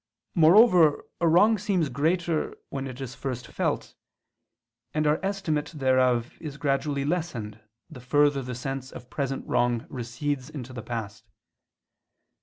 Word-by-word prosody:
Moreover 170 -2 +6
a 170 - +2
wrong 205 +7 +5
seems 190 -5 +1
greater 160 +4 0
when 135 0 -4
it 130 0 -8
is 130 -2 -5
first 125 -3 -5
felt; - - -2 1.0
and 155 0 +1
our 150 +1 +3
estimate 170 -6 -2
thereof 130 -3 +2
is 145 -3 -6
gradually 140 0 0
lessened 140 -11 -3 0.3
the 145 -7 -11
further 145 +2 +3
the 125 -1 -5
sense 135 +1 -5
of 125 0 -11
present 135 -2 -3
wrong 120 -1 +1
recedes 130 +3 -3
into 130 -4 -8
the 120 - -6
past. 110 -2 -6
140 Hz, 135 wpm, -26 LUFS, 125-160 Hz, 1.0 s, Moreover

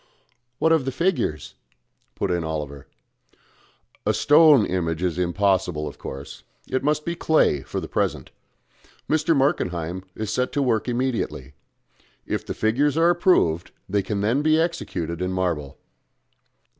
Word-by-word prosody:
"What 160 - +2
of 160 -5 +3
the 135 - -1
figures?" 165 - -1 0.6
put - - -1
in 85 -1 0
Oliver. 75 -3 -5 1.2
"A - - +1
stone 145 -6 +6
image 85 -2 -2
is 90 -1 -1
impossible, 90 -3 +1
of - - -9
course. 70 +1 -8 0.3
It 130 0 -1
must 150 +1 0
be 170 - -1
clay 155 - +2
for - - -5
the - - -6
present. - - -2 0.8
Mr. 155 +1 +2
Markenheim 90 - 0
is 110 -2 -4
to - - -2
set 125 +2 0
to 145 - +1
work 115 -3 0
immediately. 120 - -2 0.7
If - - -2
the - - -6
figures 135 +8 +1
are 170 +1 +5
approved 170 - +2 0.2
they 100 +1 +1
can 100 0 -3
then 115 +7 +1
be 155 +1 +3
executed 90 - -2
in 90 0 -1
marble." 85 -7 -2
105 Hz, 145 wpm, -23 LUFS, -, 1.2 s, stone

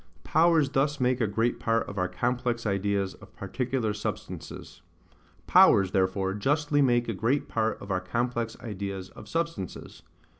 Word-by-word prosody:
Powers 160 -2 +4
thus 145 +1 +1
make 125 0 +1
a 110 - +2
great 115 +3 0
Part 115 -1 0
of 100 - -5
our 90 - +1
complex 120 +4 -1
Ideas 100 -1 0
of - - -17
particular 125 -4 -2
Substances. 105 - -6 0.6
POWERS 95 -2 +6
therefore 95 0 +1
justly 145 +7 +1
make 120 -3 +3
a 115 - -1
great 115 +8 0
part 110 0 -1
of 100 - -7
our 90 -1 0
complex 120 +3 -2
ideas 100 -4 -5
of 110 - -12
substances. 165 - -4
115 Hz, 150 wpm, -27 LUFS, 100-130 Hz, 0.6 s, POWERS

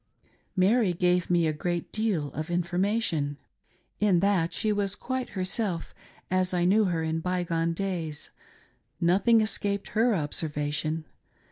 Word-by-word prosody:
Mary 195 +1 +3
gave 180 0 +1
me 175 -2 +3
a 155 - +1
great 175 +2 -3
deal 195 - -1
of 155 +3 -4
information. 175 -3 0 0.6
In 200 -4 +4
that 185 -3 +2
she 215 -1 0
was 200 -1 -1
quite 260 +2 -3
herself, 185 -2 -1 0.4
as 185 0 +1
I 175 -1 +2
knew 210 +4 +4
her 170 -3 0
in 160 0 -1
by 180 +1 -1
gone 165 -1 0
days. 165 -5 -4 0.7
Nothing 200 +7 +4
escaped 200 -2 -1
her 225 +1 +2
observation. 155 0 -2
180 Hz, 135 wpm, -27 LUFS, 165-200 Hz, 0.7 s, In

